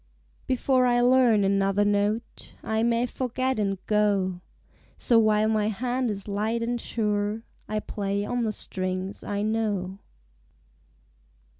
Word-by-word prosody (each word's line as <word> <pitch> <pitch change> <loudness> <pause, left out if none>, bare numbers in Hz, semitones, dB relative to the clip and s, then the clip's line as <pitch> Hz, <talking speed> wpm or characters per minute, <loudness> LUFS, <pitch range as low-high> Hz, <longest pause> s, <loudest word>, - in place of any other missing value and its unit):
Before 255 0 +2
I 240 0 +3
learn 245 -4 +4
another 195 +1 +2
note 205 +3 -1
I 220 0 0
may 235 +1 +2
forget 255 0 -2
and 195 -2 0
go, 200 -4 +1 0.6
So 235 -2 +3
while 215 -1 +3
my 215 -1 +1
hand 245 +3 -1
is 200 -1 -4
light 215 +3 -1
and 240 0 -2
sure 210 0 -1 0.3
I 215 0 -1
play 200 -1 -2
on 245 +2 -1
the 220 - 0
strings 185 -1 -4
I 205 0 -2
know. 205 -4 -1
215 Hz, 130 wpm, -26 LUFS, 200-235 Hz, 0.6 s, learn